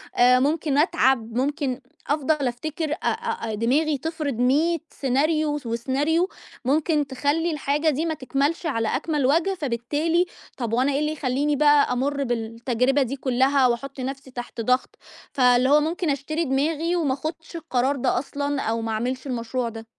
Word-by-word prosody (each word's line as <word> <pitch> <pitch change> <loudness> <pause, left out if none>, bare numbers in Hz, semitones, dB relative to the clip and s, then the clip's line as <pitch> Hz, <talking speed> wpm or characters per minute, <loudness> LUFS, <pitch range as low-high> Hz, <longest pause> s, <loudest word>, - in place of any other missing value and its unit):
آآ 250 +1 +6
ممكن 290 +1 +1
أتعَب، 265 -8 +2
ممكن 275 -1 -1 0.3
أفضل 290 -1 +1
أفتكر 305 +6 -3
أ - - +1
أ 460 - -2
أ - - -4
دماغي 280 +8 +1
تفرض 310 0 -3
100 280 +8 +2
سيناريو 300 +4 +1
وس 290 - -6
وسيناريو، 275 +10 0 0.4
ممكن 295 +2 +1
تخلّي 290 +5 0
الحاجة 295 +1 0
دي 310 +3 0
ما 320 - 0
تكملش 285 +4 -1
على 230 -8 0
أكمَل 295 0 0
وَجْه، 330 +8 +2
فبالتالي 295 +7 0 0.3
طَب 235 -3 -3
وأنا 255 +4 +2
إيه 280 - +1
اللي 300 0 0
يخلّيني 290 0 0
بقى 290 -2 +4
أمُرّ 280 +3 -1
بالتجربة 240 +3 0
دي 265 +1 -1
كًلّها 265 0 +2
وأحُط 270 +3 -3
نَفْسي 270 0 -5
تحت 245 -1 -6
ضَغْط؟ 250 +3 0 0.4
فاللي 250 -1 +4
هو 295 +1 +6
ممكن 330 +2 -1
أشتري 300 +4 -1
دماغي 310 +5 0
وما 310 -6 +1
أخُدش 320 +4 -6
القرار 280 -4 0
ده 245 - +1
أصلًا 285 +1 -3
أو 225 +1 -1
ما 225 - -3
أعملش 255 +5 -2
المشروع 240 -1 -2
ده. 225 0 -9
275 Hz, 160 wpm, -24 LUFS, 250-310 Hz, 0.4 s, آآ